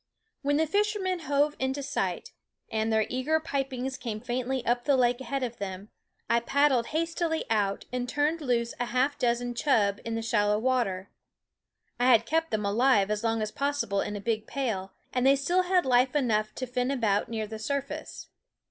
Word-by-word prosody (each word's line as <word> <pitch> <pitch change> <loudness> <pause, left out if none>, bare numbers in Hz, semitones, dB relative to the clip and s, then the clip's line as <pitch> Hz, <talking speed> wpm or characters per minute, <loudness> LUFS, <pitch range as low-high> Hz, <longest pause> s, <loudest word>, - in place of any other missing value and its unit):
When 285 0 +1
the 320 - +3
fishermen 405 0 0
hove 290 -1 +1
into 265 +2 -1
sight, - - -2 0.4
and 220 0 0
their 220 -1 +3
eager 270 +6 0
pipings 270 -4 -3
came 220 -3 -4
faintly 250 +2 -2
up 240 0 +1
the 280 -2 +4
lake 245 0 +2
THE 265 - -8
WOODS - - -12
ahead 275 +2 -1
of 240 -2 -4
them, 195 +1 -6 0.4
I 235 - +3
paddled 265 -1 +2
hastily 330 0 -1
out 200 -3 0
and 250 0 -2
turned 300 +4 0
loose 235 -4 0
a 245 - 0
half 260 +4 0
dozen 245 -1 0
chub 220 -6 +2
in 230 0 -3
the 225 - -2
shallow 210 -2 +2
water. 220 -6 0 0.9
I 245 - +3
had 230 -3 +6
kept 325 +5 0
them 210 -1 -1
alive 210 -1 +3
as 210 +1 -1
long 225 -1 +1
as 215 - -3
possible 280 -8 -1
in 210 - -3
a - - -4
big 220 0 -2
pail, 215 -9 -2 0.2
and 250 - +1
they 270 +1 +6
still 345 +7 +2
had 365 0 +2
life 255 +1 +3
enough 215 -6 +1
to 260 - -3
fin 250 0 -1
about 220 -7 +1
near 220 -2 -2
the 220 +1 -7
surface. 280 +4 -4
250 Hz, 195 wpm, -28 LUFS, 220-280 Hz, 0.9 s, had